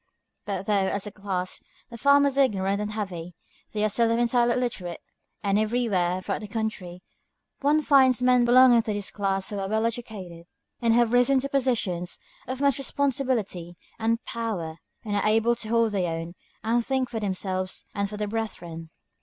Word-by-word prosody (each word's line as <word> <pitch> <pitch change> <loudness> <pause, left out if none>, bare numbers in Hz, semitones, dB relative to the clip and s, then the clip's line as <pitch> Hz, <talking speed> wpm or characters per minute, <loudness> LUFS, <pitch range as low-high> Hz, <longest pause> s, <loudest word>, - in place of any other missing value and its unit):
But 195 -2 -3
though, 200 -2 +2
as 200 +1 -2
a 210 - -6
class, 190 -3 -3 0.3
the - - -8
farmers 280 0 +4
are 280 - +4
ignorant 195 -3 -1
and 210 0 -3
heavy, 180 -5 -5 0.4
they 210 -1 -1
are 215 - +3
seldom 230 +2 +2
entirely 240 0 +3
illiterate; 230 -9 -3 0.4
and 200 0 +2
everywhere, 210 -6 0
throughout - - -3
the 210 - -6
country, 200 -5 -4 0.6
one 300 +2 +2
finds 260 -4 +5
men 250 -1 +4
belonging 245 0 +6
to 220 -2 -3
this 205 -1 -3
class 195 -1 -1
who 205 - -3
are 195 0 -3
well 220 +1 +1
educated 200 -8 -5 0.3
and 230 -1 +3
have 240 -1 +3
risen 245 +2 +4
to 275 - -3
positions 225 -11 0 0.3
of 260 +1 -4
much 280 -2 +2
responsibility 255 - -1 0.2
and 230 +1 0
power, 185 -9 -4 0.3
and 205 -1 -2
are 205 - +1
able 225 +2 +3
to 220 -1 -6
hold 230 -1 +3
their 185 -4 0
own, 165 +1 -6 0.3
and 235 +2 +1
think 265 +1 0
for 235 -2 -4
themselves 185 -2 -2
and 200 0 -1
for 210 - -7
their 210 0 -2
brethren. 175 -7 -5
215 Hz, 180 wpm, -26 LUFS, 190-240 Hz, 0.6 s, belonging